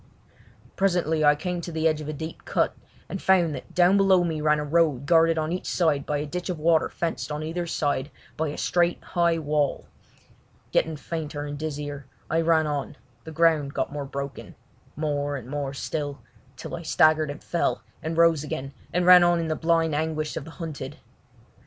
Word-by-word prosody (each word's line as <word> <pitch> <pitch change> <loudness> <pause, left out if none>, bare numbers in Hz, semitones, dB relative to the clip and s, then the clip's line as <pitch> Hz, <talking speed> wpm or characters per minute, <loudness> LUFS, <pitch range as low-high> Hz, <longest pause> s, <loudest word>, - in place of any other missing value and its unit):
Presently 175 -5 +1
I 150 0 +6
came 175 +3 -3
to 170 - -6
the 160 0 +1
edge 155 -1 0
of 150 - -6
a - - -3
deep 160 +2 -7
cut, - - 0 0.3
and 195 - -5
found 175 -5 +3
that - - -9
down 180 +2 +5
below 190 -2 +5
me 160 -3 -2
ran 150 0 +3
a 150 - -2
road 150 -4 +2
guarded 165 0 +4
on 155 0 -1
each 180 - -3
side 155 -5 +1
by 150 - 0
a 145 - -2
ditch 180 +5 -5
of 180 - -2
water 160 +1 +3
fenced 165 -2 -3
on 150 +1 -3
either 170 +2 -3
side 145 -3 -1 0.3
by 160 +1 -1
a 145 - -5
straight, 175 0 +1
high 170 -2 +1
wall. 150 -2 0 0.9
Getting 160 -1 +1
fainter 150 -1 -5
and 145 0 -5
dizzier, 145 -2 -5 0.2
I 165 - +3
ran 160 -1 +3
on; 145 -2 -3 0.3
the 160 - -7
ground 155 -3 +2
got - - -2
more 145 -1 -4
broken—more 145 +1 -5
and 125 -4 -7
more 140 0 -3
still, 145 -2 -4 0.3
till - - -6
I 170 - -7
staggered 155 -2 +3
and 145 +2 -7
fell, 170 - -1 0.2
and 160 +1 -3
rose 165 -3 +4
again, 135 -2 -5 0.2
and 180 0 +1
ran 180 -1 +9
on 175 0 +3
in 165 -1 -2
the 155 - 0
blind 165 -1 +1
anguish 155 0 -2
of - - -5
the - - -10
hunted. 150 -5 -6
155 Hz, 195 wpm, -25 LUFS, 145-170 Hz, 0.9 s, ran